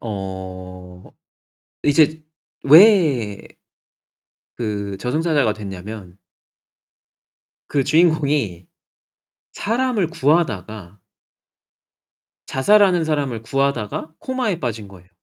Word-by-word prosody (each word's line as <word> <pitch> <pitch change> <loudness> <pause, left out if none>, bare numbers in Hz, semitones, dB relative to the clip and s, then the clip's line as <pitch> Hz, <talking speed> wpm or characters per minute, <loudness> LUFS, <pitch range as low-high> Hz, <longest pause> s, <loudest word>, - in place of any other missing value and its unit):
어 95 -3 -8 0.8
이제 155 +1 +2 0.4
왜 150 - +5 1.1
그 100 -4 -4
저승사자가 145 -1 0
됐냐면 100 -1 -9 1.5
그 140 -2 0
주인공이 145 - +1 0.9
사람을 230 -5 -1
구하다가 110 - -1 1.5
자살하는 185 +3 +3
사람을 140 -7 -2
구하다가 135 +2 -2
코마에 250 -9 -3
빠진 115 -5 -4
거예요. 90 -1 -17
125 Hz, 175 characters per minute, -20 LUFS, 100-160 Hz, 1.5 s, 왜